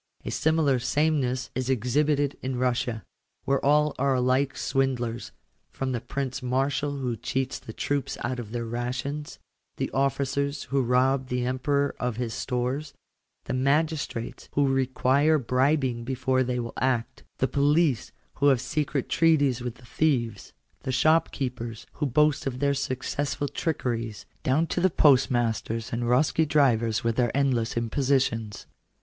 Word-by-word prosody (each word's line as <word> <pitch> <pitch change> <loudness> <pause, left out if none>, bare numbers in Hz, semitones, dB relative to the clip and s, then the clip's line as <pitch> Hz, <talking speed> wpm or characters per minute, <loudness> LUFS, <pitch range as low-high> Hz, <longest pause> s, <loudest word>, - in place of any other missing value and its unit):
A - - -3
similar 155 -4 +2
sameness 130 -2 0
is 130 0 -2
exhibited 140 +4 +1
in 130 -1 -3
Bussia, 120 -3 -1 0.4
where 135 0 +1
all 150 +1 +3
are 135 0 +2
alike 130 +2 +1
swindlers, 125 -3 -1 0.4
from 135 -1 -3
the 120 -3 -2
Prince 135 -1 -4
Marshal 135 +3 0
who 125 -3 -2
cheats 130 +4 -2
the - - -9
troops 135 +3 -2
out 125 +1 -2
of 110 -3 -7
their 120 0 -3
rations, 130 +5 -4 0.4
the - - -2
officers 140 +2 0
who 140 0 0
rob 130 +2 +2
the 125 -1 -1
Emperor 140 +3 0
of 125 -2 -1
his 120 -2 -2
stores, 130 +4 -2 0.5
the - - -4
magistrates 140 -2 -1
who 140 -2 +2
require 135 +3 +3
bribing 130 -1 +1
before 130 +1 0
they 125 0 -2
will 115 -1 -4
act, 130 0 -1
the 130 - +1
police 145 0 +2 0.3
who 145 - +3
have 135 -3 +5
secret 145 -1 -2
treaties 145 -7 +3
with 120 -1 -4
the 120 - -17
thieves, 120 -7 -1 0.3
the 130 - -4
shopkeepers 130 -5 0
who 150 - -1
boast 150 +2 +2
of 125 -2 -3
their 140 +2 +2
successful 140 +1 -2
trickeries, 120 -7 -3 0.2
down 145 +6 +2
to 175 - -2
the 185 - +4
postmasters 120 - +2
and 115 - -1
dhrosky 130 +6 +2
drivers 120 -6 +2
with 115 -1 0
their 120 -2 +3
endless 125 -5 +1
imposi 130 +4 +2
tions. 115 -5 -3
130 Hz, 145 wpm, -26 LUFS, 125-140 Hz, 0.5 s, have